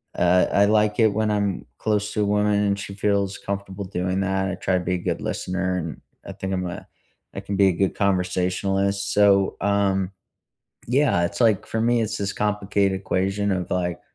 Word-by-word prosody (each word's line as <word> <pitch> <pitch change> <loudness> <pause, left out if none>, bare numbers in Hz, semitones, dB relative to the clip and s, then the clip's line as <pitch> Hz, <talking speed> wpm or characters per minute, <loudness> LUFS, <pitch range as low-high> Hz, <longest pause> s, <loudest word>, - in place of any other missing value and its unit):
uh, 90 +1 +4
I 100 - +4
like 105 +1 +2
it 110 -2 +4
when 110 +1 0
I'm 100 -3 -1
close 105 -1 -1
to 105 - 0
a - - +2
woman 105 0 +2
and 100 -1 +1
she 100 0 -6
feels 100 -1 0
comfortable 100 0 -5
doing 95 0 -2
that, 95 0 0
I 95 - -3
try 95 0 0
to 90 - -3
be 90 - 0
a - - -1
good - - -3
listener, 90 0 -2
and 85 -2 -5 0.2
I 100 - -8
think 95 0 -4
I'm 90 -1 -2
a 85 - -7 0.5
I - - -5
can 100 - -4
be 95 0 +5
a - - +1
good 95 +2 0
conversationalist, 95 +1 0
so, 100 -1 +4
um 100 -2 +1 0.8
Yeah, 130 -8 +2
it's 85 - -5
like, 110 -5 +3
for 110 - -3
me, 120 +1 +2
it's 110 0 -2
this 100 -1 -2
complicated 100 -2 0
equation 95 +2 -1
of, 90 -2 -4
like, 90 -2 -1
100 Hz, 200 wpm, -23 LUFS, 95-105 Hz, 0.8 s, be